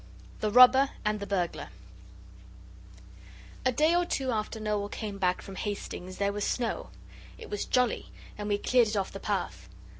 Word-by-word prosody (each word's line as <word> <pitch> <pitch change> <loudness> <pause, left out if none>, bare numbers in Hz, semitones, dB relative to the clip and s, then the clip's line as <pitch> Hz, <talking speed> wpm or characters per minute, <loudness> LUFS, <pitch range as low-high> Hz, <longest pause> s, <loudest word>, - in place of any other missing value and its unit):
THE 215 - 0
ROBBER 255 +4 +7 0.2
AND 210 0 +1
THE 200 - -5
BURGLAR 180 -4 -2 1.9
A 255 - +3
day 305 +6 +3
or 350 0 +3
two 270 -6 -1
after 220 0 -2
Noel 210 -1 -1
came 205 -2 -5
back 180 -1 +1
from 195 - -9
Hastings 185 -3 -5
there 200 0 0
was 205 0 -3
snow; 230 - -2 0.5
it - - -11
was 205 - -2
jolly. 250 -3 +1 0.3
And 210 0 -5
we 205 - +2
cleared 245 +2 +3
it 210 0 -2
off 195 - -1
the 195 - -7
path. 90 - -3
210 Hz, 170 wpm, -29 LUFS, 200-245 Hz, 1.9 s, ROBBER